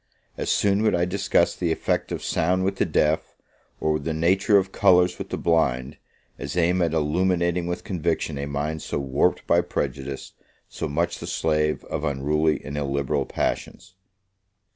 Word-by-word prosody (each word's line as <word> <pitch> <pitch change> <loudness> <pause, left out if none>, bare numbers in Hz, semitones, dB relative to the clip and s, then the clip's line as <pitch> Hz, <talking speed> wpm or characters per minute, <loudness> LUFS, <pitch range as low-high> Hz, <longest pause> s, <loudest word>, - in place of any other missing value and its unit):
As - - -3
soon 100 0 +2
would 110 -3 +3
I 85 0 +2
discuss 100 +3 +1
the 85 -2 -1
effect - - -1
of - - -4
sound 90 +3 +1
with 95 +1 -1
the - - +1
deaf, 75 +1 +1 0.4
or 75 0 +1
the 80 +2 -3
nature 95 +5 +3
of 95 -1 0
colours 90 -3 +4
with - - -6
the - - -3
blind, 70 -5 +1 0.4
as 70 +5 -5
aim 90 +1 +2
at 85 -2 +1
illuminating 85 +2 +1
with 90 0 -3
conviction 80 -5 -2
a 70 - -3
mind 75 +2 -3
so - - -3
warped 70 -1 0
by 85 - +4
prejudice, 70 -5 -4 0.3
so - - -4
much 85 +4 -1
the - - -7
slave 75 -1 0
of - - -4
unruly 75 +2 +1
and 75 0 -4
illiberal 70 0 -1
passions. 95 0 -3
80 Hz, 165 wpm, -24 LUFS, 75-90 Hz, 0.4 s, colours